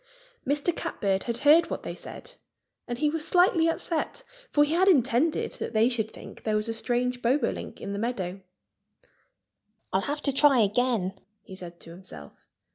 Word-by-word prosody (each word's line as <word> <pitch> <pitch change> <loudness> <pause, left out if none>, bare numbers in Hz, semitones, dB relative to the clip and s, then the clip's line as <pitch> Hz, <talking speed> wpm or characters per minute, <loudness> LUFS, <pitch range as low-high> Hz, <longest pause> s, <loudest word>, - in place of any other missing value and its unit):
Mr. 295 +4 +1
Catbird 195 -1 -1
had 235 -1 -2
heard 325 +3 +6
what - - -4
they - - -5
said. - - -10 0.5
And 240 - -3
he 300 - +1
was 320 -1 -3
slightly 355 -2 +4
upset, 330 +7 -2 0.3
for 295 - +4
he 295 +2 0
had 370 +3 +3
intended 275 0 +2
that - - -4
they 225 +2 +4
should 220 -3 0
think - - -12
there 215 -1 -1
was 215 +1 0
a 225 - -2
strange 245 +2 -1
Bobolink 255 +5 -1
in 200 - -5
the 200 - -3
meadow. 195 -5 -3 1.5
"I'll 190 - +3
have 290 +6 -3
to 280 - +1
try 275 -3 +5
again," 210 -3 0 0.2
he 190 - -11
said 175 -2 -10
to 165 - -12
himself. 170 - -13
245 Hz, 175 wpm, -27 LUFS, 200-295 Hz, 1.5 s, heard